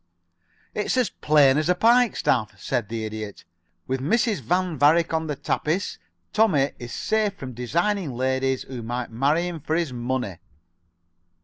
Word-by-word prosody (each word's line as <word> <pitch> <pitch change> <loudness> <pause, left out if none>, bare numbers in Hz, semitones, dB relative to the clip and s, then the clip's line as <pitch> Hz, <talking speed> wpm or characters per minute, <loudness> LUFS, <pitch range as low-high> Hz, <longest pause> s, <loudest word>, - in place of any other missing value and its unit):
"It's 210 +4 -1
as 250 -3 +2
plain 145 -2 +4
as 155 +2 -1
a 180 - +4
pike 235 +3 +4
staff," 105 -2 0
said 120 -2 -2
the 115 -1 -3
Idiot. 110 -1 -7 0.4
"With 130 0 -2
Mrs. 215 - +1
Van 180 +7 0
Varick 160 +4 +4
on 160 0 0
the 150 - -2
tapis, 160 +7 -2 0.3
Tommie 160 -11 +3
is 120 -1 -7
safe 215 -2 0
from 130 -9 -8
designing 170 - -1
ladies 130 +1 0
who 125 -3 -7
might 120 +1 -4
marry 145 +9 +1
him 170 -2 -5
for 155 +2 -2
his 165 -6 -1
money." 125 -5 -3
145 Hz, 155 wpm, -24 LUFS, 125-180 Hz, 0.4 s, plain